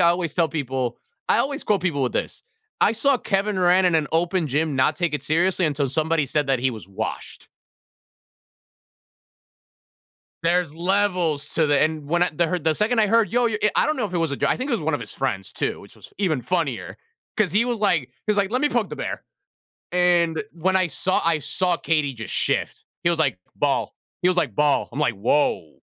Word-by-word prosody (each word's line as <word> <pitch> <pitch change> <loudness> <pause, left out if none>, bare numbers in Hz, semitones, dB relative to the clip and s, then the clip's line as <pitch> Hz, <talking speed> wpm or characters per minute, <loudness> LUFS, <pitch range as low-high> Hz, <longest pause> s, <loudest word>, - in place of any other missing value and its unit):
I 170 - +6
always 170 -3 -2
tell 170 -2 +2
people 130 -6 -3 0.3
I - - +4
always 280 +2 -1
quote 205 -2 +1
people 160 -7 0
with 125 - 0
this, - - -3 0.4
"I 210 - +4
saw 270 +5 +2
Kevin 200 -1 -1
Durant 180 0 +4
in 175 - +2
an 155 -2 +2
open 170 +1 +1
gym 150 +1 -1
not 130 +4 +2
take 175 -4 -1
it 150 - -3
seriously 175 +4 +1
until 145 -2 -1
somebody 155 +2 0
said 145 +2 0
that 135 -2 +2
he 130 +1 +1
was 110 -5 -9
washed." 95 - -6 2.9
There's 170 -2 +1
levels 175 -4 0
to 160 - +2
the 145 -1 +3
and 155 -2 0
when 175 +4 +1
I 180 - +2
the 170 +2 +2
heard 175 -1 -3
the 160 -1 +2
second 220 +7 +1
I 215 - +4
heard, 225 +1 +3
"Yo, 245 +1 +2
you" 220 -2 -1
i - - +6
I - - +4
don't 305 +1 0
know 250 - -1
if 195 - -5
it 175 - 0
was 165 -3 0
a - - -2
j - - 0
I - - +2
think 255 +3 -4
it - - -1
was 225 - 0
one 155 0 0
of - - -3
his - - -2
friends 110 -8 -2
too, - - -2
which - - -15
was - - -10
f - - -18
even 170 -9 0
funnier, 165 -8 -2 0.4
'cause 205 -7 +1
he 210 +4 +3
was 240 -2 -2
like 195 -6 +3
he 125 - -17 0.2
was 210 - +2
like, 200 -1 +1
"Let 250 +3 0
me 295 - +3
poke - - -1
the - - -6
bear." - - -4 0.7
And 175 -2 +2
when 185 +3 0
I 185 -1 +2
saw 185 +3 0
I 165 -1 +2
saw 175 +5 0
KD 150 -5 0
just 115 -2 -6
shift. - - -1 0.2
He 170 - +3
was 170 - 0
like, 140 - +1 0.2
"Ball." - - 0 0.3
He 180 - +4
was 185 - +1
like, 140 - 0
"Ball." 150 +2 +2
I'm 140 - -4
like, 135 -6 +1
"Woah." 100 - 0
170 Hz, 230 wpm, -23 LUFS, 145-190 Hz, 2.9 s, I